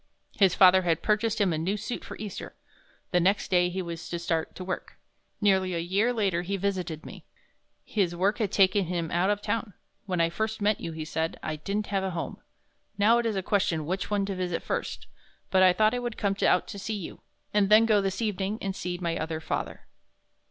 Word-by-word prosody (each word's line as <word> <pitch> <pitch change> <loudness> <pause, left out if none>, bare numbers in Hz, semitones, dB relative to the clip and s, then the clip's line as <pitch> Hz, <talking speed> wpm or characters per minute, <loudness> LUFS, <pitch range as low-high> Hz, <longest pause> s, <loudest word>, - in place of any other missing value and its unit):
His 190 -3 +4
father 185 0 +7
had 170 -3 0
purchased 215 +1 +1
him 195 -5 +2
a 155 - -1
new 190 +6 -1
suit 215 +4 -5
for - - -8
Easter. 210 -3 -7 0.6
The 180 - +4
next 195 +4 +1
day 180 -1 +4
he 185 +1 -3
was 170 -1 -6
to 170 - -2
start 165 -1 -2
to 185 - -6
work. 185 0 -5 0.4
Nearly 190 -3 +2
a - - 0
year 195 +8 +1
later 200 -7 0
he 195 +3 -2
visited 180 -5 -2
me. - - -10 0.6
His 185 -5 0
work 195 +4 +1
had 210 -4 0
taken 195 -1 +4
him 170 -2 -3
out 175 +3 +2
of 205 0 0
town. 215 -1 -2 0.3
"When 180 -2 -1
I 165 0 +2
first 220 +4 -2
met 210 0 +2
you," 165 - -4
he 160 -1 -5
said. 160 +1 -2
"I 155 - -2
didn't 200 +7 -2
have 195 -1 +1
a 190 - -1
home. - - -5 0.6
Now 220 +4 +5
it 235 - 0
is 220 - -1
a 190 - -1
question 175 -6 +1
which 185 +4 -2
one 205 -1 +1
to 195 - -3
visit 180 -2 -2
first, - - -3 0.5
but 190 - +4
I 185 -1 +7
thought 215 +5 +3
I 245 - 0
would 240 -2 -4
come 200 -1 0
out 180 - +3
to 200 - -6
see 215 +2 -3
you, 195 -5 -7 0.3
and 205 -2 +3
then 215 +2 +7
go 215 -2 +4
this 195 +3 -2
evening 205 0 -1
and 195 -1 -3
see 180 -2 -3
my 170 -2 -2
other 160 0 -3
father." 160 - -4
190 Hz, 220 wpm, -27 LUFS, 175-205 Hz, 0.6 s, father